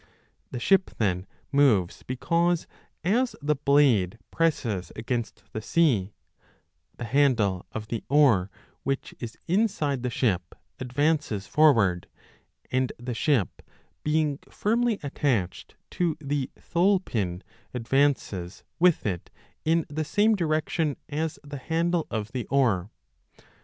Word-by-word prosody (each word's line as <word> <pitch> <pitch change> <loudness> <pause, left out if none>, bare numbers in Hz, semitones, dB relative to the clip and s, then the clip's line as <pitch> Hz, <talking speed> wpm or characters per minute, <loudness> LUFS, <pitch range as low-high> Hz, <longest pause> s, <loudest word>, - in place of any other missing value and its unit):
^ - - -30 0.5
The 125 - -5
ship 190 +9 +3
then 95 -3 0 0.2
moves 125 - +3
20 - - -20
because, 170 +6 +1 0.4
as 240 +8 +1
the 150 +1 +1
blade 130 -9 +3
presses 115 - 0
against 115 +1 -3
the 110 - -3
sea, 115 - +2 0.9
the - - -5
handle 115 -8 +2
of 110 - -5
the 115 - -3
oar, 125 -10 +4 0.3
which 135 0 -3
is 120 -2 -7
inside 170 - +1
the 125 - -1
ship, 95 -9 -1 0.2
advances 140 -4 0
forward, 110 - +3 0.6
and 130 0 +1
the 120 +1 -5
ship, 115 - 0 0.4
being 150 -2 +1
firmly 230 +1 +1
attached 125 -10 -1 0.2
to 170 -4 0
the 140 -2 -2
thole 185 +3 +2
pin, 95 - -3 0.3
advances 120 -8 0 0.2
with 175 -1 +4
it 90 -5 -3 0.4
in 165 0 +2
the 155 +2 -3
same 210 +8 +3
direction 155 -3 0
as 155 +1 -2
the 145 0 -7
handle 165 +3 0
of 110 -1 -3
the 125 -3 -4
oar. 110 -9 +2
140 Hz, 125 wpm, -26 LUFS, 110-160 Hz, 0.9 s, oar